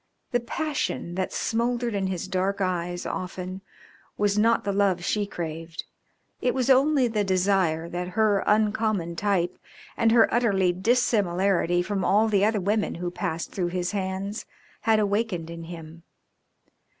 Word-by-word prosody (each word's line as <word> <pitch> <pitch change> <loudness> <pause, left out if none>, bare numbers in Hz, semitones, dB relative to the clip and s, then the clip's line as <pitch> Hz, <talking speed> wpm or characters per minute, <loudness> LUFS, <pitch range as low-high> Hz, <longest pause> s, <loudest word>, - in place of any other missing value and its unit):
The 245 - +2
passion 270 - -3
that 185 +1 -2
smouldered 235 +1 -1
in 195 -2 -1
his 185 -1 -3
dark 190 +1 -1
eyes 175 -2 -2
often 185 +1 -5 0.6
was 205 -1 +2
not 225 +2 +3
the 200 - -1
love 195 -3 +1
she 205 0 0
craved, 165 -2 -6 0.6
it 250 - +1
was 260 0 +2
only 270 0 +4
the 215 -3 0
desire 185 -4 +1
that 175 +1 -4
her 210 -3 +3
uncommon 210 -4 +1
type 180 -2 0 0.4
and 225 -1 +3
her 230 -1 +6
utter 235 -3 +2 0.2
dissimilarity 190 -4 +2
from 195 0 -2
all 215 +3 +3
the 200 -2 +2
other 215 0 +2
women 205 +3 0
who 180 - -5
had 175 - -3
passed 170 -4 -3
through 180 -3 -1
his 180 0 -2
hands 195 +1 -3 0.4
had 220 - +6
awakened 200 -5 -1
in 165 0 -7
him. 165 -1 -10
195 Hz, 150 wpm, -26 LUFS, 175-220 Hz, 0.6 s, her